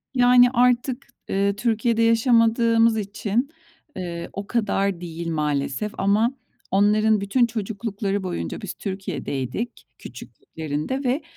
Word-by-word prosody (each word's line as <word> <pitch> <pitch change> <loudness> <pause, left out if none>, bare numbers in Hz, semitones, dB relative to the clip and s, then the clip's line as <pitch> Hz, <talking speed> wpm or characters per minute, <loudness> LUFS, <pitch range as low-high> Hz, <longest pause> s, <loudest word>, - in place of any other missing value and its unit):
Yani, 245 0 +6
artık, 250 +1 +1 0.2
eee, 200 +1 +1
Türkiye'de 230 +1 +1
yaşamadığımız 230 0 +4
için, 210 +5 -2 0.5
eee, 170 -2 -5
o 200 0 -6
kadar 200 -5 0
değil 170 -1 -6
maalesef 150 +4 -1
ama 210 +5 +2 0.4
onların 210 +2 +3
bütün 220 +5 +2
çocuklukları 205 -2 -3
boyunca 180 +3 -4
biz 200 -4 -5
Türkiye'deydik 190 - -5
küçüklüklerinde 160 - -6
ve 260 +4 0
210 Hz, 105 wpm, -23 LUFS, 190-235 Hz, 0.5 s, Yani